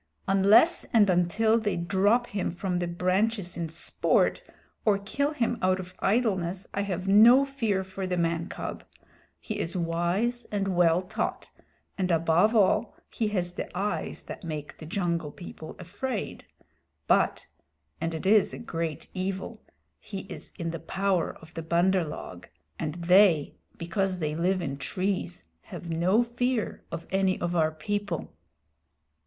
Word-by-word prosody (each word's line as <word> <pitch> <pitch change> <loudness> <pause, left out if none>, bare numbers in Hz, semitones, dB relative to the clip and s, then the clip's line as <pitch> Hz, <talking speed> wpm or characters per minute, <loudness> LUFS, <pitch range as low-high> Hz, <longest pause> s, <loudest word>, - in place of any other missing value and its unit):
"Unless 200 - +5
and 215 -3 +6
until 215 +6 +3
they 210 -4 -1
drop 200 +7 +2
him 200 -5 -2
from 180 +1 -2
the 175 - -1
branches 185 +3 0
in 170 -2 -3
sport, 165 - +1 0.4
or 210 -2 +3
kill 280 +9 -1
him 240 -5 -1
out 185 0 +2
of 185 0 -8
idleness, 195 -5 0
I 200 - 0
have 190 -2 -3
no 230 +7 +7
fear 225 -9 -1
for 190 0 -5
the 180 -1 -1
man 165 0 0
cub. - - -6 0.6
He - - -5
is 170 +3 -2
wise 175 +8 0
and 195 -3 -2
well 175 0 +4
taught, 185 - -4 0.5
and 185 -1 +1
above 170 +6 +3
all 205 +1 +3 0.2
he 225 - -1
has 180 -4 -1
the - - -5
eyes 205 +2 -2
that - - -9
make 155 -3 -6
the 155 - -9
Jungle 170 -3 -1
People 160 -2 -10
afraid. 205 +6 -5 0.6
But - - +2 0.6
(and 165 0 -1
it 160 - -5
is 210 +1 +4
a - - -8
great 165 -8 -4
evil) 190 +4 -4 0.4
he 195 -2 -7
is 190 0 -8
in 165 -1 -3
the 165 - -5
power 190 +2 -1
of 160 +1 -16
the 165 - -4
Bandar 175 +3 +2
log, 90 - -8 0.3
and 155 0 -3
they, 175 -2 +4 0.2
because 190 +2 -1
they 155 -3 -2
live 180 +2 +1
in 140 -3 -3
trees, 185 - -2 0.2
have 170 - -7
no 185 +8 +3
fear 240 -1 -1
of 165 - -5
any 190 -1 +1
of 175 0 -2
our 160 -2 +3
people." 205 +2 -3
185 Hz, 155 wpm, -27 LUFS, 170-205 Hz, 0.6 s, no